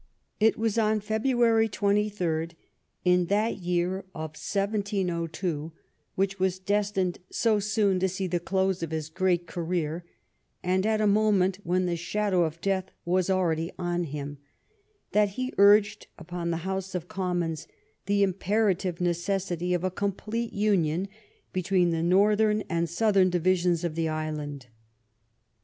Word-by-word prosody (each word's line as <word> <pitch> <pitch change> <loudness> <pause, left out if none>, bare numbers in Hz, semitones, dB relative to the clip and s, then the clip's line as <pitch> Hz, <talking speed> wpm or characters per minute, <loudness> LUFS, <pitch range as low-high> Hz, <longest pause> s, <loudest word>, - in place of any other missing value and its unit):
It 220 +1 +4
was 225 0 0
on 215 -1 +2
February 225 +1 +2
28, 200 -6 0 0.5
in 180 0 +4
that 210 +4 +1
year 180 +1 0 0.2
of 155 -1 -5
1702, 180 -4 -2 0.4
which 195 0 0
was 185 -1 +1
destined 195 -1 0
so 220 -2 +2
soon 205 -2 +1
to 190 +1 +1
see 190 +1 -3
the 175 -1 -1
close 190 +1 0
of 165 - -3
his 155 -1 -4
great 175 0 +1
career, 170 -1 -3 0.6
and 185 +3 +1
at 215 -1 +1
a - - +3
moment 200 -2 +3
when 180 +2 +1
the 175 -1 0
shadow 185 +1 0
of 160 +1 -5
death 190 -1 -1 0.2
was 185 +1 +1
already 170 -3 +1
on 175 -1 -1
him, 145 -1 -6 0.7
that 210 -1 +3
he 255 +1 -2
urged 205 +1 +5
upon 170 +1 -5
the 165 - 0
House 190 0 -3
of 175 -1 -3
Commons 175 -4 -2 0.4
the 200 0 +3
imperative 190 -2 0
necessity 175 0 -1
of 175 - -2
a 185 - 0
complete 215 +4 -3
union 195 -4 +1 0.4
between 185 -1 +2
the 165 -1 0
northern 210 +4 +3
and 170 -1 -1
south 210 +4 +1
ern 185 -1 +6
divisions 180 -1 +1
of 170 -2 -1
the 165 0 -1
island. 150 -3 -4
185 Hz, 145 wpm, -27 LUFS, 170-205 Hz, 0.7 s, ern